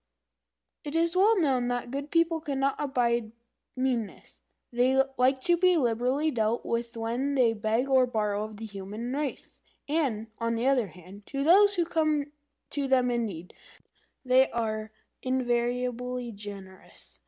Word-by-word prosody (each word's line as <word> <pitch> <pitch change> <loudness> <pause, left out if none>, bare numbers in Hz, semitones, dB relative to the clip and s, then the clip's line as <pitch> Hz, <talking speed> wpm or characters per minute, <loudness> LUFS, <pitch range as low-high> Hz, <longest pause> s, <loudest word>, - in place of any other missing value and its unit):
It 295 +1 -6
is 335 +1 +1
well 410 +3 +4
known 260 -6 +1
that 245 0 0
the 240 - -12
Good 285 - -11
People 335 0 +2
cannot 275 -2 0
abide 235 -5 0 0.4
meanness. 250 -5 -3 0.3
They 255 +2 +3 0.2
like 260 +1 +2
to 345 +5 +2
be 365 0 +4
liberally 255 +4 +1
dealt 225 -1 0
with 235 0 -3
when 240 +5 -1
they 245 -4 +4
beg 225 +4 0
or 260 -2 +4
borrow 210 -3 -1
of 215 -1 -8
the 225 - -7
human 210 +4 -6
race; 285 -1 -4 0.3
and, 280 -8 0
on 230 0 0
the 230 +2 -1
other 260 -5 +3
hand, 185 +4 -14
to 275 0 -3
those 400 +6 +6
who 345 -2 +1
come 310 -3 0 0.4
to 285 -1 -2
them 255 -2 +3
in 235 -1 0
need, 180 -3 -9 0.7
they 260 +1 +4
are 220 -2 -3 0.3
invariably 250 -1 -1
generous. 200 -2 -11
250 Hz, 155 wpm, -28 LUFS, 225-280 Hz, 0.7 s, those